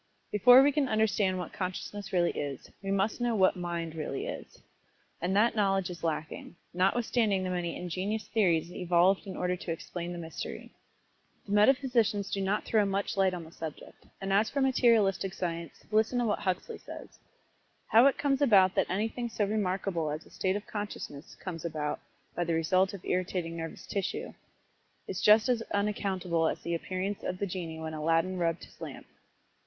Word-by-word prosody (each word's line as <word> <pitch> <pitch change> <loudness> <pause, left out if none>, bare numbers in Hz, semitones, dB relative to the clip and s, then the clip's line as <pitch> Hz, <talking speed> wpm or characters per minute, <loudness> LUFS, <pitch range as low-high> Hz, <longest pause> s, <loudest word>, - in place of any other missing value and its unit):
Before 245 +5 +8
we 290 - +4
can 280 -2 +1
understand 210 -3 +2
what 180 -2 -5
Consciousness 195 +2 -5
really 175 -2 +2
is, 140 -3 -5
we 195 - -5
must 195 +4 0
know 240 -1 +1
just 215 - 0
what 185 - +5
"Mind" 170 -2 -3
really 155 -4 -4
is - - -8 0.6
and 180 +3 0
that 225 +3 +4
knowledge 195 -3 +1
is 170 -1 -10
lacking, 155 0 -3 0.2
notwithstanding 200 +1 +2
the 185 - -2
many 175 -2 -2
injenious 190 +5 -3
theories 175 -6 +2
evolved 180 +3 +2
in 190 - -6
order 180 0 0
to 175 -1 -5
explain 170 +1 -5
the 175 - -5
mystery. 165 -1 -7 0.7
The 200 - -8
metaphysicians 220 -2 +3
do 195 - -1
not 195 +2 0
throw 220 -2 +3
much 195 0 -1
light 190 -2 +2
on 175 - -6
the 160 - -13
subject, 160 -2 -9
and 195 0 -2
as 210 +3 +3
for 280 - -2
materialistic 225 -8 +3
science, 170 -3 -4
listen 220 +3 +2
to 245 - +2
what 210 - 0
Huxley 190 - -2
says: - - -11 0.7
"How 235 +4 +6
it 275 - +2
comes 275 -1 +1
about 195 -8 +6
that - - +1
anything 225 +5 -2
so 215 -2 0
remarkable 190 -5 -1
as 150 +2 -5
a - - -19
state 190 0 0
of 205 - -4
consciousness 205 -8 -6
comes 165 -4 -7
about 155 -3 -2 0.4
by 175 - 0
the 165 -1 0
result 185 +4 +2
of 190 - -11
irritating 180 -2 -1
nervous 165 -1 -6
tissue, 195 -2 -3 0.7
is 190 - -4
just 215 +2 +6
as 245 -2 +2
unaccountable 190 -5 0
as - - -2
the 170 - -2
appearance 185 +4 -3
of 180 - -3
the 200 - -1
genie 175 -4 -5
when 160 0 -5
Aladdin 165 +4 +1
rubbed 165 -1 0
his - - -16
lamp." - - -7
190 Hz, 180 wpm, -30 LUFS, 170-210 Hz, 0.7 s, Before